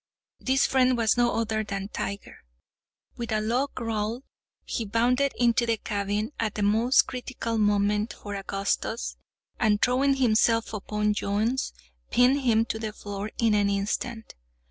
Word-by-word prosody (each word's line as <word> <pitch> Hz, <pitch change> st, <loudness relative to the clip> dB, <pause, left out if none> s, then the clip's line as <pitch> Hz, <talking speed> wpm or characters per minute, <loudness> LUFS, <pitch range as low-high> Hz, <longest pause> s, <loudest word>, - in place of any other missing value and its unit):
This 265 Hz, +1 st, +2 dB
friend 255 Hz, -1 st, +3 dB
was 225 Hz, -2 st, +2 dB
no 240 Hz, -1 st, +3 dB
other 220 Hz, -1 st, 0 dB
than 195 Hz, -1 st, -4 dB
Tiger. 200 Hz, -2 st, -5 dB, 0.8 s
With 235 Hz, -1 st, -4 dB
a 215 Hz, -, +2 dB
low 240 Hz, +6 st, 0 dB
growl, 225 Hz, +1 st, -2 dB, 0.4 s
he 230 Hz, -, -2 dB
bounded 245 Hz, +6 st, +2 dB
into 240 Hz, 0 st, +2 dB
the 230 Hz, -1 st, +1 dB
cabin, 205 Hz, +2 st, -2 dB
at 220 Hz, -2 st, -2 dB
a 210 Hz, -, 0 dB
most 225 Hz, +6 st, +4 dB
critical 245 Hz, -2 st, -4 dB
moment 210 Hz, +1 st, +1 dB
for 205 Hz, -, -8 dB
Augustus, 195 Hz, -, -2 dB, 0.4 s
and 210 Hz, -1 st, +3 dB
throwing 270 Hz, +4 st, +3 dB
himself 230 Hz, -3 st, +2 dB
upon 210 Hz, 0 st, -1 dB
Jones, 215 Hz, +6 st, -1 dB, 0.4 s
pinned 255 Hz, +3 st, +4 dB
him 225 Hz, -3 st, +3 dB
to 220 Hz, -, -4 dB
the 215 Hz, -1 st, -4 dB
floor 205 Hz, 0 st, -6 dB
in 225 Hz, -2 st, +3 dB
an 205 Hz, -1 st, +3 dB
instant. 210 Hz, +3 st, -3 dB
220 Hz, 145 wpm, -26 LUFS, 205-240 Hz, 0.8 s, most